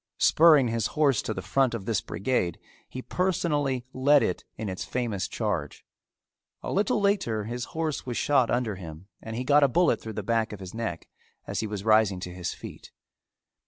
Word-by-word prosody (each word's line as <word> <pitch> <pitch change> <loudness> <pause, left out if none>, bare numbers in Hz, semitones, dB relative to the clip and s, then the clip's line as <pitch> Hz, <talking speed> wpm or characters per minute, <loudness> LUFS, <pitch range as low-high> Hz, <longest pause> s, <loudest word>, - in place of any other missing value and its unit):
Spurring 155 -6 +5
his 115 -2 0
horse 140 -6 +3
to - - -4
the - - -4
front 130 -4 +1
of 100 -4 -6
this 110 -4 0
brigade, 95 -6 -1 0.3
he 130 - -7
personally 150 -8 0
led 140 +2 +4
it 90 - -2
in 110 - -4
its 95 -1 -4
famous 115 -7 -2
charge. - - -3 0.8
A - - -4
little 205 +2 +1
later 195 - +1
his 120 +3 -4
horse 160 -3 -1
was 125 -2 -4
shot 135 -5 +3
under 120 -5 -1
him 80 -1 -9 0.2
and 110 0 -6
he 125 - -2
got 145 +3 +4
a 140 - +6
bullet 170 +6 +2
through 110 - -7
the - - -4
back 115 -2 0
of 105 - -8
his 95 -2 -9
neck 110 -7 -4 0.4
as - - -3
he 110 - -1
was 105 -1 -5
rising 110 -4 +4
to 90 - -6
his 90 -1 -4
feet. - - -10
115 Hz, 195 wpm, -27 LUFS, 105-140 Hz, 0.8 s, a